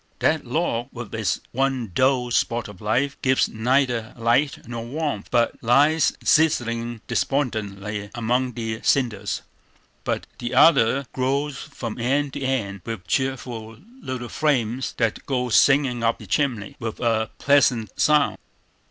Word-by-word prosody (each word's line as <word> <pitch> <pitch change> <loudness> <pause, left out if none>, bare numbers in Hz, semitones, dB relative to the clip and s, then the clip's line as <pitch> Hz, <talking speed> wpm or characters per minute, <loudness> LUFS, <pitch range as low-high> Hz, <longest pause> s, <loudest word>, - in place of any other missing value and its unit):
That 155 -4 +1
log, 120 -4 -1
with 120 -3 -8
its 110 -2 -1
one 130 -4 -1
dull 130 0 +2
spot 120 0 0
of 105 -3 -12
fire, 120 +7 +1
gives 130 0 +3
neither 120 0 0
light 120 +5 +1
nor 120 -1 -5
warmth, 135 -4 -3
but 120 -1 +1
lies 145 +7 +4
sizzling 120 -7 +2
despondently 105 -6 -2
among 125 +2 0
the 110 -1 -4
cinders. 120 -7 0 0.6
But - - -2
the 120 - -3
other 135 -4 +5
glows 135 +2 -1
from 115 -1 -7
end 135 +3 0
to - - -5
end 110 -8 -2
with 115 -6 -6
cheerful 120 -1 -2 0.2
little 125 - -5
flames 130 -4 0
that 115 -3 0
go 125 -2 -1
singing 125 +4 +4
up 115 0 +2
the 110 - -11
chimney 110 0 -1
with 115 -2 -5
a 110 -2 +1
pleasant 130 -6 +3
sound. 150 -2 +3
120 Hz, 135 wpm, -23 LUFS, 115-135 Hz, 0.6 s, other